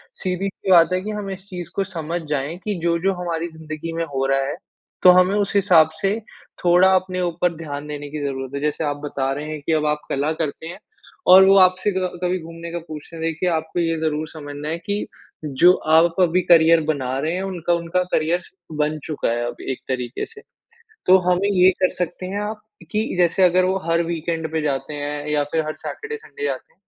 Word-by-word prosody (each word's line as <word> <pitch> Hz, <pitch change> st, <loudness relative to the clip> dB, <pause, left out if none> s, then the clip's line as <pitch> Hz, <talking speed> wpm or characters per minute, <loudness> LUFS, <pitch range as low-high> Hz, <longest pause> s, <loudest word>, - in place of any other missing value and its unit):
सीधी 185 Hz, +1 st, -2 dB
सी 190 Hz, 0 st, -4 dB
बात 170 Hz, 0 st, +6 dB
है 185 Hz, -, +1 dB
कि 215 Hz, +3 st, -4 dB
हम 200 Hz, -, -5 dB
इस 190 Hz, +1 st, -8 dB
चीज़ 175 Hz, -3 st, -6 dB
को 195 Hz, -, +1 dB
समझ 170 Hz, -2 st, -4 dB
जाएँ, 150 Hz, +3 st, -2 dB
कि 205 Hz, +2 st, -3 dB
जो-जो 170 Hz, +3 st, +1 dB
हमारी 170 Hz, 0 st, -2 dB
ज़िंदगी 155 Hz, +1 st, -6 dB
में 165 Hz, 0 st, -1 dB
हो 135 Hz, 0 st, 0 dB
रहा 135 Hz, 0 st, +2 dB
है, -, -, -4 dB, 0.5 s
तो 180 Hz, -, +10 dB
हमें 185 Hz, +2 st, +3 dB
उस 205 Hz, -1 st, 0 dB
हिसाब 180 Hz, -6 st, +5 dB
से, 200 Hz, +3 st, +1 dB, 0.5 s
थोड़ा 180 Hz, +2 st, +6 dB
अपने 185 Hz, 0 st, -1 dB
ऊपर 175 Hz, 0 st, 0 dB
ध्यान 145 Hz, -2 st, -6 dB
देने 145 Hz, -1 st, -6 dB
की 150 Hz, +1 st, -5 dB
ज़रूरत 135 Hz, -1 st, -4 dB
है। 140 Hz, -, -3 dB
जैसे 150 Hz, +1 st, -1 dB
आप 145 Hz, 0 st, -1 dB
बता 135 Hz, -2 st, -2 dB
रहे 150 Hz, +2 st, -5 dB
हैं 155 Hz, -2 st, -5 dB
कि 160 Hz, -, +1 dB
अब 155 Hz, -1 st, +1 dB
आप 150 Hz, 0 st, 0 dB
कला 145 Hz, +3 st, 0 dB
करते 160 Hz, +1 st, -4 dB
हैं 175 Hz, +3 st, -8 dB, 0.5 s
और 190 Hz, 0 st, +9 dB
वो 195 Hz, -, +6 dB
आपसे 185 Hz, +2 st, +4 dB
क 180 Hz, -1 st, -3 dB
कभी 180 Hz, +1 st, 0 dB
घूमने 165 Hz, 0 st, -9 dB
का 175 Hz, -, -3 dB
पूछते 155 Hz, +2 st, -9 dB
हैं 160 Hz, -, -6 dB
देखिए 165 Hz, +2 st, 0 dB
आपको 160 Hz, +1 st, -2 dB
ये 165 Hz, -1 st, 0 dB
ज़रूर 155 Hz, 0 st, -1 dB
समझना 145 Hz, -1 st, -7 dB
है 165 Hz, -, -2 dB
कि, 205 Hz, +4 st, -3 dB, 0.4 s
जो 150 Hz, +6 st, +5 dB, 0.2 s
आप 165 Hz, +1 st, +5 dB
अभी 180 Hz, +1 st, +3 dB
करियर 165 Hz, -1 st, +5 dB
बना 130 Hz, -4 st, -1 dB
रहे 160 Hz, +4 st, -1 dB
हैं, 185 Hz, -, -2 dB
उनका 175 Hz, -3 st, -1 dB
उनका 170 Hz, +2 st, 0 dB
करियर 165 Hz, +3 st, +1 dB, 0.4 s
बन 150 Hz, +1 st, +1 dB
चुका 155 Hz, -, -2 dB
है 120 Hz, 0 st, -1 dB
अब -, -, -6 dB
एक 130 Hz, -, -3 dB
तरीक़े 125 Hz, -2 st, -3 dB
से। 440 Hz, -2 st, -15 dB, 0.7 s
तो 185 Hz, -, +8 dB
हमें 180 Hz, +3 st, +2 dB
ये 185 Hz, -1 st, +5 dB
कर 185 Hz, -, +4 dB
सकते 180 Hz, +1 st, -4 dB
हैं 200 Hz, +2 st, -3 dB
आप 210 Hz, +1 st, -4 dB, 0.3 s
कि 215 Hz, +1 st, +1 dB
जैसे 175 Hz, +2 st, +3 dB
अगर 180 Hz, 0 st, +5 dB
वो 190 Hz, +1 st, +1 dB
हर 165 Hz, 0 st, +3 dB
वीकेंड 165 Hz, -1 st, -3 dB
पे 160 Hz, -1 st, 0 dB
जाते 140 Hz, 0 st, -2 dB
हैं 145 Hz, 0 st, -4 dB
या 150 Hz, -1 st, +1 dB
फिर 160 Hz, -1 st, +2 dB
हर 155 Hz, -, -3 dB
सैटरडे-संडे 445 Hz, 0 st, -7 dB
जाते 485 Hz, -, -4 dB
हैं। -, -, -45 dB
165 Hz, 220 wpm, -21 LUFS, 150-185 Hz, 0.7 s, तो